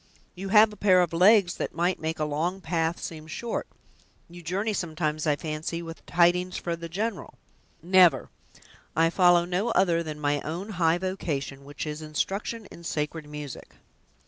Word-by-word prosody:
"You 195 +2 -6
have 210 +1 +6
a - - -13
pair 185 -2 +5
of 170 - -3
legs 185 +1 +5
that - - -4
might 175 +2 0
make 160 +1 -3
a 155 - -1
long 160 +6 -2
path 165 -2 -1
seem 155 -1 -7
short! 230 +9 -4 0.6
you 175 +1 -12
journey 195 +6 -1
sometimes, 155 -4 -2
I 150 - +3
fancy, 160 +3 -4
with 165 0 -9
tidings 180 +1 +2
for 170 -1 -3
the 170 0 -8
general." 205 +4 -4 0.5
"Never; 180 -1 +5 0.6
I 165 +1 +3
follow 175 -1 +5
no 180 +6 -1
other 175 -3 +2
than 155 -2 -6
my 145 -1 0
own 175 +7 -5
high 170 -4 +2
vocation, 155 -7 -4
which 145 +2 -6
is 150 0 -5
instruction 195 +9 -3
in 170 - -12
sacred 150 -1 -3
music!" 150 -3 -8
170 Hz, 170 wpm, -27 LUFS, 155-185 Hz, 0.6 s, have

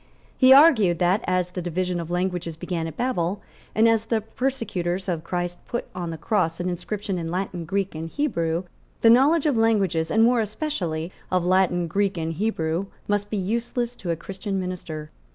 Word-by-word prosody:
He 260 -1 +6
argued 265 - +7
that, 180 +6 +2
as 180 -1 +1
the 180 - -4
division 180 +1 -1
of 165 -1 -5
languages 175 -2 -2
began 165 -1 -3
at 160 - -8
Babel, 200 -7 -1 0.4
and 220 +1 +5
as 225 -1 +3
the 225 -1 +1
persecutors 205 -7 -2
of 170 -4 -2
Christ 175 0 -3
put 240 - -3
on 175 -2 -4
the 165 - -5
cross 170 -3 0
an 175 - -2
inscription 190 +1 -3
in 165 -1 -4
Latin, 180 -1 -3
Greek 195 +3 -1
and 160 +1 -5
Hebrew, 170 - -1 0.4
the 225 - +7
knowledge 280 +6 +5
of 295 -4 +3
languages, 195 -8 +2
and 220 +5 +4
more 240 0 +4
especially 190 - -3 0.2
of 180 -1 +1
Latin, 180 -1 +3
Greek 195 +3 0
and 165 0 -2
Hebrew, 170 -2 -1 0.2
must 205 0 0
be 215 - -2
useless 235 +4 -2
to 180 - -6
a 170 - +1
Christian 195 +4 -4
minister. 165 -4 -5
185 Hz, 185 wpm, -24 LUFS, 170-220 Hz, 0.4 s, argued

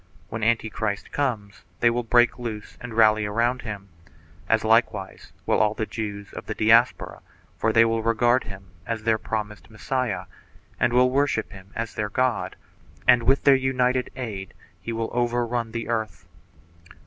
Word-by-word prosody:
When 110 - -5
Antichrist 110 -2 -1
comes 110 -8 -2 0.2
they 120 - +4
will 120 +1 0
break 120 +1 +3
loose 110 -3 -6
and 120 -2 -7
rally 110 -1 +5
around 120 +4 0
him, 100 -3 -7 0.6
as - - +3
likewise - - 0
will - - +2
all 110 0 +2
the 110 - -2
Jews 105 -2 -6
of - - -8
the - - -4
Diaspora, 115 +3 +3 0.3
for 115 - +1
they 115 +1 +5
will 115 0 0
regard 120 +3 +2
him 95 -2 -11 0.2
as 115 -1 -3
their 110 -1 +2
promised 105 -1 -5
Messiah 125 +2 -2 0.5
and 120 - +2
will 125 +1 +4
worship 140 -5 0
him 95 -2 -13
as 115 -3 -4
their 105 -1 -2
God, 125 +1 0 0.5
and 125 -1 +6
with 135 +4 +2
their 140 - +7
united 130 -1 +1
aid 105 -7 -6 0.3
he 115 - -5
will 115 0 -3
overrun 120 -1 -1
the 115 0 -4
earth. 110 -6 -3
115 Hz, 160 wpm, -24 LUFS, 110-120 Hz, 0.6 s, their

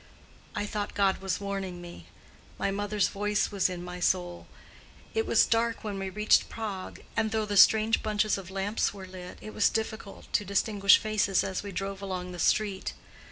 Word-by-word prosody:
I 205 - -1
thought 205 0 -4
God 195 -1 +2
was 190 -2 -2
warning 195 -3 -4
me: 170 - -11 0.5
my 200 - 0
mother's 205 0 0
voice 205 +1 0
was 195 -2 +2
in 175 -1 -5
my 180 0 -7
soul. 175 -1 0 0.7
It 445 0 0
was - - +5
dark 230 0 0
when 205 -2 -4
we 195 0 -3
reached 210 +2 +3
Prague, 205 -4 -6
and 220 - +1
though 220 0 0
the 205 -1 -3
strange 220 +3 +6
bunches 215 -1 +1
of 190 -3 -7
lamps 195 +2 -1
were 190 -1 -8
lit 185 -1 -9
it 215 - -8
was 215 - +3
difficult 220 -2 -4
to - - +3
distinguish 200 0 +4
faces 215 -3 +1
as 190 - -3
we 205 - -7
drove 195 +1 -4
along 185 -2 -4
the 175 - -8
street. 200 -1 +1
200 Hz, 185 wpm, -29 LUFS, 190-210 Hz, 0.7 s, strange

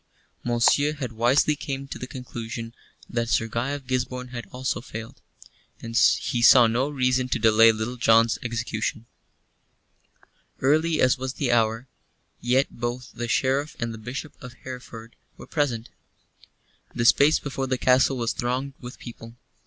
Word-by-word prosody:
Monceux 120 +5 +3
had 130 -5 -4
wisely 125 +7 +2
come 140 -2 -5
to - - -7
the 125 - -6
conclusion 115 -3 -7 0.3
that 120 -1 -2
Sir 115 -1 +2
Guy 115 +4 -2
of 140 -1 -5
Gisborne 125 0 -3
had 120 -2 -7
also 130 0 -3
failed, 115 -2 -9 0.6
and 115 0 -8
he 120 +1 +3
saw 120 +1 +8
no 120 +5 +1
reason 130 -2 0
to - - 0
delay 115 0 +6
Little 110 +3 -4
John's 115 -1 +4
execution. 115 -1 -3 1.5
Early 155 +4 +2
as 130 0 +3
was 130 0 -3
the 135 -3 -1
hour, 115 +2 +1 0.5
yet 130 +3 +1
both 120 +1 -4
the 120 - -4
Sheriff 135 +5 0
and 115 -2 -3
the 110 - -9
Bishop 125 +7 -6
of 125 -3 -9
Hereford 125 -3 -9 0.2
were - - -11
present. 125 -7 -2 1.1
The 120 - 0
space 145 +5 +5
before 135 -2 -4
the 130 0 0
castle 130 +1 +3
was 115 -1 -1
thronged 130 +3 -2
with 125 0 -9
people. 115 -1 -11
125 Hz, 155 wpm, -25 LUFS, 115-130 Hz, 1.5 s, saw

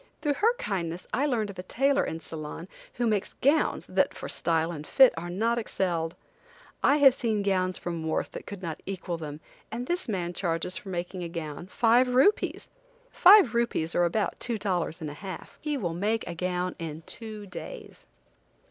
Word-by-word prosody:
Through 295 -2 +2
her 450 - +2
kindness 175 - -3
I 275 +6 +2
learned 220 -7 0
of 190 - -12
a - - -1
tailor 270 +9 +2
in 160 - -4
Ceylon 160 +2 -7 0.3
who 245 - 0
makes 210 -4 0
gowns, 295 +3 +2
that - - +1
for - - -6
style 165 0 0
and 150 -3 -7
fit 265 -2 +7
are 170 +1 -5
not 230 +6 +1
excelled. 170 -7 -1 0.7
I 285 - +5
have 275 -3 +7
seen 220 -5 -1
gowns 185 -2 +1
from 165 -2 -4
Worth 160 - -1
that - - -8
could 200 -2 -7
not 165 -3 -4
equal 185 -3 -3
them, 150 -1 -7 0.3
and 240 +3 -3
this 350 -3 -2
man 180 -4 -2
charges 170 0 -1
for 195 - -7
making 180 +1 -4
a 170 - -4
gown, 165 0 -6
five 240 +4 +4
rupees! 400 +12 +2 0.4
Five 375 - +7
rupees 235 -9 0
are 175 - +3
about 205 +5 -1
two 235 -2 -1
dollars 180 -6 -1
and 155 - -3
a 145 - -12
half. 190 -3 -8
He 300 -2 -1
will 175 -9 -2
make 210 +6 0
a 175 - -5
gown 180 +1 -2
in 160 -1 -6
two 215 -2 -7
days. 430 - -9
190 Hz, 190 wpm, -28 LUFS, 170-235 Hz, 0.7 s, fit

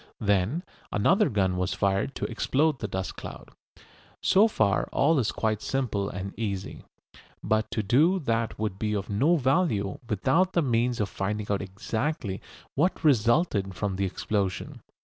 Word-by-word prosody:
Then 100 - +1 0.3
another 190 - +3
gun 95 -3 +1
was 90 +1 -1
fired 100 +6 0
to - - -2
explode 150 0 +1
the 105 - -3
dust 95 -1 -4
cloud. - - -9 0.7
So 205 +4 +5
far 110 - +1
all 150 +1 +3
is 115 -4 +1
quite 110 -1 -1
simple 105 -7 -1
and 95 +1 -5
easy. 100 -4 -4 0.6
But 110 0 +1
to 110 - -2
do 150 - +4
that 115 -8 -1
would 105 -3 -3
be 105 -1 -1
of 100 0 -3
no 140 +12 +3
value 130 - +1
without 135 - +2
the 170 - +2
means 120 -1 +1
of 105 - +1
finding 105 +2 -3
out 100 - 0
exactly 105 +2 -3 0.3
what 175 +7 0
resulted 120 - +2
from 100 -2 -2
the 100 - 0
explosion. 95 0 -2
110 Hz, 155 wpm, -27 LUFS, 100-135 Hz, 0.7 s, So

